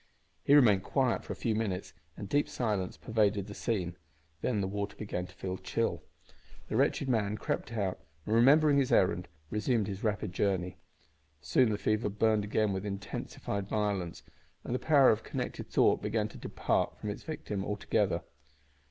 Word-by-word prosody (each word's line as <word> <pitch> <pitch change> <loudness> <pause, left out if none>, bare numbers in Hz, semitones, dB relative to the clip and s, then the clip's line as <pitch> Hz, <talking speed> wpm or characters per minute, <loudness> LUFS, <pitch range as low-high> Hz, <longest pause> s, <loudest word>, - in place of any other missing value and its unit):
He 145 - +5
remained 110 -9 +6
quiet 130 +3 0
for - - -7
a - - -3
few 115 - -1
minutes 105 -4 -2 0.2
and 100 - -6
deep 145 +7 +1
silence 105 -6 -2
pervaded 105 -3 +1
the 105 - -8
scene. 90 -6 -2 0.4
Then 115 -5 0
the 95 - 0
water 100 +1 -3
began 90 -4 -4
to - - -17
feel 95 0 -4
chill. - - -1 0.7
The - - -2
wretched 140 - +2
man 105 -4 +1
crept 110 - -3
out 100 -4 -1 0.3
and, 110 - -1
remembering 140 +5 +6
his 135 - +1
errand, 90 -1 +3 0.2
resumed 110 +1 +1
his 95 0 -5
rapid 105 -3 -1
journey. 95 -2 0 0.6
Soon 80 - +3
the 105 - 0
fever 110 +1 0
burned 110 +1 +2
again 105 0 +1
with 95 0 -3
intensified 100 0 -4
violence, 100 -5 -2 0.4
and - - -4
the 125 - 0
power 145 -4 +6
of 110 0 0
connected - - -5
thought - - +3
began - - 0
to - - -12
depart - - -1
from 105 - -4
its 100 - -7
victim 105 -10 -4
altogether. 105 0 0
105 Hz, 170 wpm, -31 LUFS, 100-115 Hz, 0.7 s, remained